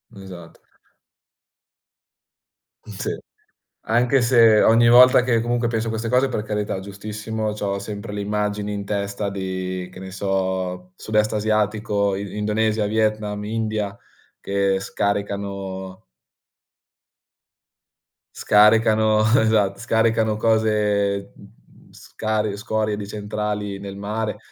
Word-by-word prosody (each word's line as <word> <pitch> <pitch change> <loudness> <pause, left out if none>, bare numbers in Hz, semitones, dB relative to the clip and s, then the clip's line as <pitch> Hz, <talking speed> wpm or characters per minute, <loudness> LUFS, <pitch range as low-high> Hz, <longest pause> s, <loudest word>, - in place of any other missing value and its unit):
Esatto. 90 -4 -12 2.2
Sì. - - -5 0.7
Anche 120 +3 +2
se 115 -3 +5
ogni 115 +1 +5
volta 125 +1 +7
che 120 -3 +1
comunque 120 +1 0
penso 115 -1 -2
a - - -1
queste 110 +1 -3
cose, 125 +3 +2
per 105 -4 -3
carità, 105 -2 -3
giustissimo, 105 +2 -5
c'ho 100 -2 -3
sempre 100 0 -7
le 105 - -3
immagini 105 0 -2
in 100 -1 -5
testa 100 0 -3
di, 95 -1 -4
che 90 - -12
ne 95 0 -8
so, 95 -2 -2
sud-est 105 +1 0
asiatico, 105 -1 0
I 100 +1 -6
Indonesia, 105 0 0
Vietnam, 105 -1 -1
India, 110 -2 -3 0.4
che 100 -1 0
scaricano 100 -2 -4 2.3
scaricano 110 0 +4 0.2
esatto, 110 -3 +2
scaricano 110 -1 +1
cose, 105 -3 +1
mhmm, 100 +2 -20
scarie 110 -1 -3
scorie 105 0 -1
di 105 -1 -6
centrali 105 -1 -4
nel 100 0 -7
mare 105 +2 -3
105 Hz, 110 wpm, -22 LUFS, 100-110 Hz, 2.3 s, volta